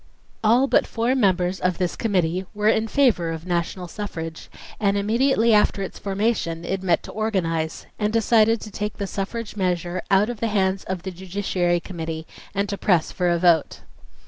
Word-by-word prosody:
All 235 +5 +5
but - - +2
four 235 +2 0
members 185 -6 +1
of 180 -1 0
this 180 -2 -1
committee 185 -4 0
were 210 0 0
in 220 0 +2
favor 225 -10 +2
of 165 0 -5
national 180 +1 -2
suffrage, 165 -4 -6 0.3
and 200 -1 +2
immediately 230 +2 +3
after 210 -1 +3
its 190 - -7
formation 195 -5 -1
it 190 +2 -2
met 180 -3 +1
to - - -9
organize 165 -7 -1
and 210 0 +1
decided 225 0 +3
to 215 - -8
take 210 +1 -4
the 200 - -2
suffrage 205 +4 -4
measure 180 -2 -1
out 200 +4 +4
of 235 - -8
the 230 - 0
hands 195 -2 +1
of 185 -2 -4
the 190 - -4
Judiciary 180 -1 -1
Committee 165 -3 -6 0.3
and 200 +1 0
to 200 - -3
press 175 -5 +2
for 180 -1 0
a 170 - +2
vote. 170 -2 +2
195 Hz, 180 wpm, -23 LUFS, 175-215 Hz, 0.3 s, All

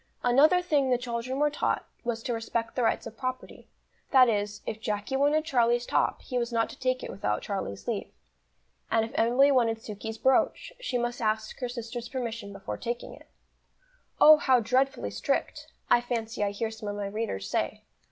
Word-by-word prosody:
Another 300 +9 +5
thing 290 -6 +2
the 250 - +3
children 245 +1 -3
were 295 +1 +2
taught, 295 - -1 0.2
was 235 -2 -3
to 245 - -1
respect 230 0 -3
the 255 - 0
rights 225 - +1
of 220 - -8
property; 255 +1 -5 0.4
that 260 -2 +7
is, 205 -2 -1
if 220 - -5
Jacky 210 +4 -2
wanted 295 +3 +2
Charlie's 240 -4 +2
top, - - 0
he 250 -2 -2
was 235 0 -2
not 230 -1 0
to - - -13
take 255 0 0
it - - -5
without 105 - -2
Charlie's 100 - -4
leave; - - -3 0.8
and 225 0 +2
if 225 - -9
Emily 250 +5 +4
wanted 235 -4 +3
Sukey's 220 0 -7
brooch, 265 - +1
she 380 - -2
must 240 0 -2
ask 215 0 -1
her 250 -2 -3
sister's 240 0 -6
permission 230 -5 -4
before 195 -1 -6
taking 240 0 -4
it. - - -15 0.9
"Oh, 310 0 +9
how 260 -4 +4
dreadfully 255 +4 0
strict!" - - -2 0.2
I 240 - +5
fancy 230 -2 -3
I 205 - +1
hear 220 +2 -3
some 220 -1 -6
of 205 - -4
my 205 -1 -3
readers 200 - -3
say. - - -2
235 Hz, 190 wpm, -28 LUFS, 220-255 Hz, 0.9 s, Oh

